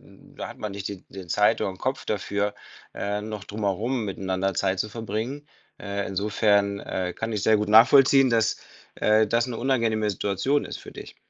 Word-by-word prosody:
da - - -11
hat - - -10
man 105 -2 -4
nicht 100 0 -5
die 100 -2 -8
den 95 -3 -9
Zeit 105 +5 +3
oder - - 0
'n 95 - -10
Kopf 130 +1 -3
dafür, 100 0 -1 0.4
äh, 105 +1 -2
noch 105 -2 -6
drumherum 110 +4 -2
miteinander 95 0 -2
Zeit 95 +1 0
zu 105 - -1
verbringen. 115 +6 -5 0.3
Äh, 100 0 -4
insofern, 100 0 +1
äh, 90 -1 -3
kann 110 +1 -4
ich 105 -3 -2
sehr 110 0 +4
gut 105 0 -2
nachvollziehen, 130 +4 +6
dass, 115 -1 +2 0.4
äh, 110 +1 +3
das 115 +3 +1
'ne 120 - -4
unangenehme 115 -4 +1
Situation 105 +9 0
ist - - -7
für - - -12
dich. - - -10
105 Hz, 185 wpm, -25 LUFS, 100-115 Hz, 0.4 s, nachvollziehen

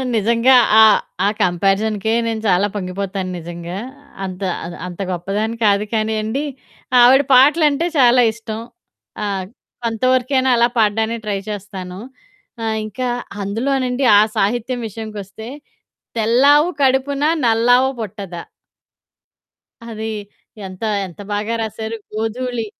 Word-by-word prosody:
నిజంగా 230 +4 +4 0.3
ఆహ్, 220 -1 +7 0.3
ఆ - - +4
కంపారిజన్‌కే 200 +4 +1
నేను 220 -1 -2
చాలా 190 +2 +3
పొంగిపోతాను 190 0 -4
నిజంగా. 170 +2 -7 0.5
అంత 185 +1 -7 0.2
అ - - -5 0.2
అంత 175 0 -10
గొప్పదాన్ని 205 +6 -2
కాదు 205 +1 +3
కానీ 220 0 0
అండి, 255 +7 -2 0.6
ఆవిడ 265 +3 +6
పాటలంటే 295 +4 +4
చాలా 245 0 +6
ఇష్టం. 220 -1 -7 0.6
ఆ! - - -1 0.6
కొంతవరకైనా 255 +3 +1
అలా 235 +1 +4
పాడడానికి 220 +1 +1
ట్రై 200 -2 -1
చేస్తాను. 190 -2 -7 0.6
ఆహ్, 220 0 -1
ఇంకా 250 +4 -4 0.3
అందులోనండి 255 +5 -1
ఆ - - +7 0.2
సాహిత్యం 240 +4 0
విషయంకొస్తే, 215 0 -8 0.7
'తెల్లావు 280 +9 +4
కడుపున 270 +2 +1 0.2
నల్లావు 245 +3 +4
పుట్టదా.' 195 -5 -6 1.4
అది 220 -1 -6 0.6
ఎంత, 185 +2 -12 0.3
ఎంత 175 - -15
బాగా 210 +3 -2
రాశారు 220 +1 -4 0.2
గోధూళి 230 +2 -3
220 Hz, 110 wpm, -19 LUFS, 200-250 Hz, 1.4 s, ఆహ్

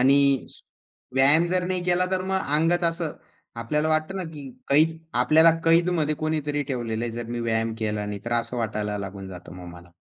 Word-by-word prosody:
आणि 135 +2 +5 1.0
व्यायाम 145 +6 +5
जर 180 0 0
नाही 185 -1 -1
केला 180 0 +2
तर 185 -1 0
मग 190 0 0 0.2
अंगच 170 +2 +2
असं 165 -2 -1 0.5
आपल्याला 150 +6 0
वाटतं 155 +4 0
ना 190 - -3
की 145 -3 -8 0.2
कैद 155 +3 +4 0.3
आपल्याला 160 +2 +6
कैद 170 +2 +4
मध्ये 155 0 +1
कोणीतरी 150 -2 -1
ठेवलेलं 120 -4 -3
आहे. 120 - -4
जर 120 0 -5
मी 120 0 -3
व्यायाम 115 -1 -1
केला 105 -1 -2
नाही 105 -1 -5
तर 120 - -3
असं 120 +1 -1
वाटायला 105 -2 -2
लागून 100 -1 -7
जातं 90 -2 -10
मग 90 -1 -9
मला. 85 0 -15
140 Hz, 190 wpm, -25 LUFS, 110-165 Hz, 1.0 s, आपल्याला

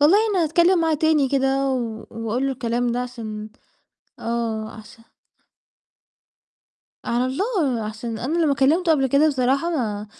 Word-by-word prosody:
والله 320 +8 +6
أنا 370 -4 +2
هاتكلم 340 +3 +3
معاه 320 -1 +2
تاني 300 -3 +2
كده، 270 0 +1
و 230 -4 -4
وأقول 230 +4 -2
له 270 - 0
الكلام 245 -1 -1
ده 245 - -1
عشان 220 -4 -7 0.7
آه، 230 -2 -3
عشا 225 +1 -14 2.0
على 245 +2 0
الله، 285 - -1
عشان 220 +1 -5
أنا 305 +9 -2
لمَّا 285 -3 +2
كلَّمته 320 +6 +3
قبل 270 -3 +2
كده 280 +4 +4
بصراحة، 275 +4 +1
ما 215 -9 -2
260 Hz, 140 wpm, -22 LUFS, 230-305 Hz, 2.0 s, والله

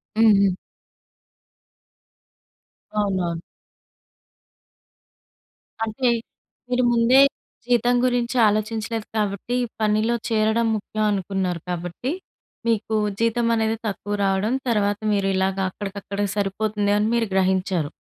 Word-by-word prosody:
హ్మ్. 225 0 +6
హ్మ్. 195 -2 +3 2.4
అవునవును. 185 -5 -1 2.4
అంటే, 225 +3 0 0.6
మీరు 250 0 +2
ముందే 235 +3 +5 0.5
జీతం 245 0 +3
గురించాలోచించలేదు 225 -2 +1
కాబట్టి, 210 +3 -1 0.3
పనిలో 215 +2 +2
చేరడం 220 +1 +2
ముఖ్యం 215 +1 -2
అనుకున్నారు 190 -3 -2
కాబట్టి, 175 +8 -3 0.6
మీకు 220 -1 0 0.2
జీతం 230 +1 +1
అనేది 220 0 0
తక్కువ 205 0 -4
రావడం, 195 +5 +1
తర్వాత 205 -2 +1
మీరిలాగ 195 -1 +1
అక్కడికక్కడికి 200 0 -4
సరిపోతుంది 205 +1 0
అని 210 +1 +1
మీరు 235 -1 +1
గ్రహించారు. 185 -4 +1
210 Hz, 85 wpm, -23 LUFS, 195-230 Hz, 2.4 s, హ్మ్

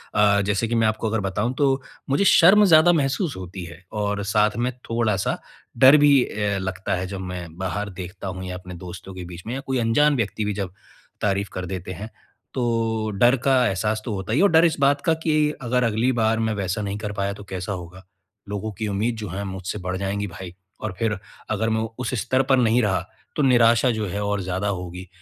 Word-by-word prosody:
अ, 100 -1 +4
जैसे 100 +3 0
कि 120 - -1
मैं 115 -1 +3
आपको 110 +1 -1
अगर 110 +1 0
बताऊँ 100 +5 -1
तो, 135 0 +1 0.3
मुझे 140 +8 +2
शर्म 195 +3 +7
ज़्यादा 165 -1 +7
महसूस 150 +3 0
होती 90 0 -7
है 85 +2 -12
और 105 -1 -2
साथ 105 +1 +2
में 120 +2 0 0.2
थोड़ा-सा 110 -4 0 0.4
डर 130 +5 +8
भी 145 -3 +5
अ, 105 -3 -2
लगता 95 -1 -3
है 95 +1 -3
जब 95 0 -6
मैं 85 -2 -7
बाहर 95 +3 -3
देखता 95 +2 -7
हूँ 95 0 -5
या 90 0 -5
अपने 90 0 -10
दोस्तों 90 +2 -9
के 90 -1 -7
बीच 85 +1 -9
में 115 - -3
या 135 - -3
कोई 130 -1 0
अनजान 145 +6 +3
व्यक्ति 110 -3 -1
भी 105 - -1
जब 95 -3 -4 0.5
तारीफ़ 100 0 0
कर 90 -1 -4
देते 95 0 -5
हैं, 105 +3 -7 0.4
तो 115 -3 0
डर 120 +5 +5
का 135 -1 +4
एहसास 105 +2 -1
तो 115 - -3
होता 95 +2 -3
ही 135 - +2
है 195 - +5
और 200 - +6
डर 165 +1 +6
इस 165 - +2
बात 140 +1 +3
का 165 - +4
कि 155 -2 +2 0.3
अगर 125 0 +1
अगली 115 +2 +2
बार 110 0 +2
मैं 110 -1 0
वैसा 100 +1 -2
नहीं 100 0 -3
कर 105 -1 -4
पाया 100 -1 -2
तो 105 0 -10
कैसा 95 0 -5
होगा? 90 0 -9 0.5
लोगों 105 +2 -3
की 105 +2 -4
उम्मीद 105 +4 -1
जो 105 -3 -5
है 95 +4 -4
मुझसे 95 +1 -5
बढ़ 90 0 -3
जाएँगी 100 +1 -2
भाई, 90 0 -9 0.3
और 110 -3 -3
फिर 110 -3 0 0.3
अगर 110 - 0
मैं 110 0 +1 0.2
उस 125 0 -3
स्तर 130 +1 +2
पर 135 - +6
नहीं 120 0 +3
रहा, 95 -3 +2 0.4
तो 150 - +1
निराशा 120 -1 +5
जो 110 -2 -2
है 100 +3 -3
और 100 -1 -1
ज़्यादा 95 +2 -2
होगी। 90 -1 -5
105 Hz, 225 wpm, -23 LUFS, 95-120 Hz, 0.5 s, डर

